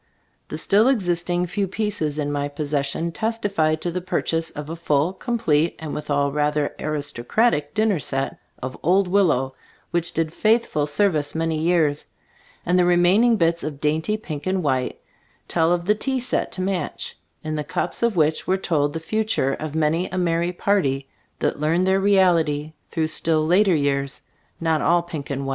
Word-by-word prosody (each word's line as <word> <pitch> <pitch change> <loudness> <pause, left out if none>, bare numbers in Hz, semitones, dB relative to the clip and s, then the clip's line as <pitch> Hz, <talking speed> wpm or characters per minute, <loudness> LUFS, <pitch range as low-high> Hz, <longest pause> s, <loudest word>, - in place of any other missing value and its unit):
The - - -4
still 210 +4 +4
existing 175 -7 +1
few 195 +3 -2
pieces 190 -7 -2
in 145 -1 -1
my 145 0 -1
possession 145 +2 -2
testify 205 -7 0
to 170 +2 -4
the 180 +2 -3
purchase 165 -2 -1
of 150 0 -7
a 165 - -5
full, 160 0 +1
com 235 +5 -3
plete 160 -7 +2
and 160 -2 -6
withal 145 -1 0
rather 150 0 0
aristocratic 145 - 0
dinner 215 -5 +2
set 135 0 -2 0.2
of 130 0 -4
"Old 185 +4 +3
Willow," 155 -9 +2 0.4
which 170 0 0
did 160 -1 -1
faithful 215 -10 +2
service 150 -2 0
many 165 0 0
years; 160 -3 +1 0.6
and 180 +1 +3
the - - +5
remaining 180 +7 +4
bits 170 -1 +1
of 150 -2 -5
dainty 160 +8 0
pink 155 -7 -6
and 185 -1 0
white, 130 -3 -1 0.5
tell 165 0 +2
of 175 -1 0
the 210 - +4
tea 260 +5 -1
set 250 - -1
to 185 - -3
match, 190 -1 -3 0.3
in 155 0 -3
the 150 - -2
cups - - -3
of 235 -3 +2
which 155 -1 +1
were 190 - +2
told 145 -6 0
the 160 - -3
fu 215 +7 -1
ture 135 -11 0
of 155 +1 -5
many 160 +3 +1
a 185 - -4
merry 170 -1 +1
party 155 -8 0 0.3
that - - -1
learned 165 +4 +2
their 190 +1 +3
reality 170 -6 +2 0.2
through 160 -2 0
still 155 0 +2
later 185 +2 +4
years, 140 -2 -1 0.4
not 160 -2 +1
all 175 0 +3
pink 160 -5 -7
and 140 -1 -3
white. - - -3
165 Hz, 180 wpm, -23 LUFS, 150-185 Hz, 0.6 s, the